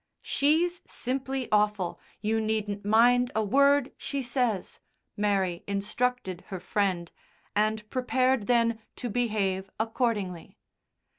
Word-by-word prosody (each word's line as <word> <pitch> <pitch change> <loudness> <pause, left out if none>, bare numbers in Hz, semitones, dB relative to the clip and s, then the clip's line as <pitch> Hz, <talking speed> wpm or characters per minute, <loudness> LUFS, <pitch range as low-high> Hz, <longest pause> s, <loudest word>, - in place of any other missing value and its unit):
"She's 330 +5 +2
simply 265 0 -3
awful. 210 -4 +1 0.2
You 220 +1 +1
needn't 215 -2 -2
mind 245 +4 +4
a 220 - +2
word 280 +5 +4
she 280 -2 -3
says," 240 -6 -1 0.4
Mary 195 -4 0
instructed 200 -1 -1
her 190 - -5
friend, 180 -2 -1 0.4
and 215 0 +1
prepared 255 -2 +1
then 230 -2 +3 0.2
to 245 -3 -4
behave 200 -5 0
accordingly. 220 -6 -2
220 Hz, 105 wpm, -28 LUFS, 200-250 Hz, 0.4 s, mind